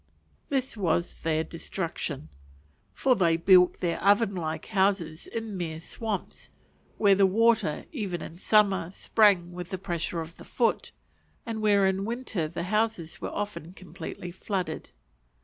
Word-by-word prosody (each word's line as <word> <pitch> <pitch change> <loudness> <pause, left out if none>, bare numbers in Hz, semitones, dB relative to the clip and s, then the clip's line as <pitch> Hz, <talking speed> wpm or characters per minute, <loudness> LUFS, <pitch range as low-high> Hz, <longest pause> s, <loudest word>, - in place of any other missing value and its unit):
This 265 -3 -1
was 175 -4 0
their 160 -1 +1
destruction. 165 - -5 0.6
For 255 - +2
they 170 -5 +3
built 180 +1 +5
their 170 -2 0
oven 200 +1 +4
like 160 -3 -3
houses 190 -6 0
in 225 -3 -5
mere 165 -3 -4
swamps, 210 +4 -5 0.5
where 200 -2 +5
the 195 0 +5
water, 220 -5 +2
even 200 - -3
in 170 - -9
summer, 195 -5 +3
sprang 195 -3 +3
with 175 0 -7
the 190 - -3
pressure 175 -2 -3
of 165 +1 -7
the - - -11
foot, 235 -2 0 0.5
and 225 -2 -4
where 205 -2 +4
in 190 0 +1
winter 225 -7 -2
the 170 +2 -5
houses 210 -4 -1
were - - -3
often 180 -5 -5
completely 180 -1 -8
flooded. 185 0 -4
190 Hz, 145 wpm, -27 LUFS, 170-210 Hz, 0.6 s, built